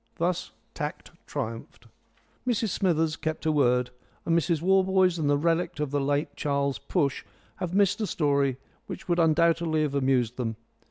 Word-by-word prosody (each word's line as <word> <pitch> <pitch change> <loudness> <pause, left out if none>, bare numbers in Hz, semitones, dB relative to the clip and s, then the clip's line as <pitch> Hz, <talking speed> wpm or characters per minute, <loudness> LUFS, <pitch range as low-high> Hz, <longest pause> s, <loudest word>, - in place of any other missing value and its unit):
Thus 175 +1 -1 0.2
tact - - -5 0.2
triumphed. 115 +1 -6 0.6
Mrs 230 -3 +1
Smithers 165 -5 +1
kept 155 0 -4
her 160 - +2
word, 125 -4 +2 0.3
and 165 - +2
Mrs 170 -1 +1
Warboys 190 0 +3
and 145 -2 +1
the 145 - +3
relict 165 +2 0
of 150 -2 -2
the 145 -1 0
late 145 +2 -1
Charles 140 -4 -1
Push 140 - -1 0.3
have 180 0 -3
missed 200 +1 +3
a 215 - 0
story 140 -6 +1 0.3
which - - -8
would 175 -1 +1
undoubtedly 165 -1 +3
have 145 -2 -1
amused 130 -4 +1
them. 115 -3 -2
155 Hz, 160 wpm, -27 LUFS, 140-175 Hz, 0.6 s, Warboys